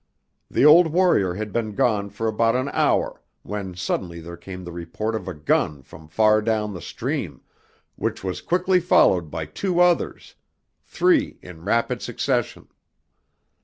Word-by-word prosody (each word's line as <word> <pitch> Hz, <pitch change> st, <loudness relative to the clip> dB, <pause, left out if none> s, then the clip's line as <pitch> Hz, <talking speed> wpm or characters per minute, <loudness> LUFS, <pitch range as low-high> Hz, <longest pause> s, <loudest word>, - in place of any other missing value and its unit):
The -, -, +2 dB
old 165 Hz, +3 st, +8 dB
warrior 160 Hz, -, +2 dB
had 105 Hz, 0 st, -5 dB
been 110 Hz, -3 st, -2 dB
gone 100 Hz, -2 st, +1 dB
for 115 Hz, +3 st, -3 dB
about 115 Hz, +1 st, +2 dB
an 130 Hz, +2 st, -1 dB
hour -, -, 0 dB, 0.2 s
when 100 Hz, -3 st, -5 dB
suddenly 90 Hz, -1 st, -3 dB
there 85 Hz, +1 st, -9 dB
came 90 Hz, +1 st, -9 dB
the 85 Hz, -, -8 dB
report 85 Hz, +6 st, -4 dB
of 110 Hz, -, -4 dB
a 95 Hz, -, -3 dB
gun 75 Hz, -1 st, 0 dB
from 80 Hz, +4 st, -14 dB
far 110 Hz, +6 st, +3 dB
down 105 Hz, -1 st, -1 dB
the 90 Hz, -, -7 dB
stream, -, -, -4 dB, 0.6 s
which -, -, -3 dB
was 95 Hz, -2 st, -4 dB
quickly 180 Hz, +1 st, +2 dB
followed 90 Hz, -, +3 dB
by 80 Hz, 0 st, -4 dB
two 175 Hz, -, -2 dB
others 180 Hz, -1 st, +1 dB, 0.5 s
three 335 Hz, -6 st, +1 dB
in 90 Hz, -2 st, -12 dB
rapid 115 Hz, +3 st, 0 dB
succession. -, -, -2 dB
105 Hz, 155 wpm, -23 LUFS, 90-130 Hz, 0.6 s, old